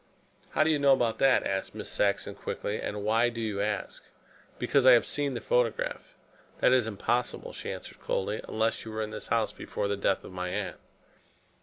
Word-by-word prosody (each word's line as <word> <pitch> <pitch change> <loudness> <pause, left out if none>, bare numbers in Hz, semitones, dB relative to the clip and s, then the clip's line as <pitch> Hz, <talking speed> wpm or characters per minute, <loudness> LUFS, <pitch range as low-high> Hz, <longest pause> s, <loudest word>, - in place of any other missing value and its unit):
"How - - +4
do 160 - +3
you 150 - +2
know 140 -1 +6
about 120 -4 +1
that?" 135 -1 +4
asked 95 0 -2
Miss - - -6
Saxon 100 -1 0
quickly. 105 - -4
"And 105 0 -4
why 115 +3 +3
do 115 -1 -7
you 105 -3 -2
ask?" 105 -1 -3 0.5
"Because 140 - +2
I 130 0 +9
have 120 - +5
seen 145 -3 -1
the 120 - -3
photograph." 120 -2 0 0.4
"That 125 - +4
is 125 -4 +3
impossible," 115 +3 -1
she - - -5
answered - - -9
coldly; 105 +3 -1
"unless 110 +1 0
you 110 - -7
were 110 0 -2
in 105 - -5
this - - -5
house - - +1
before - - -4
the 100 - 0
death 100 -1 +1
of - - -10
my 90 0 -3
aunt." - - -3
110 Hz, 200 wpm, -29 LUFS, 105-125 Hz, 0.5 s, I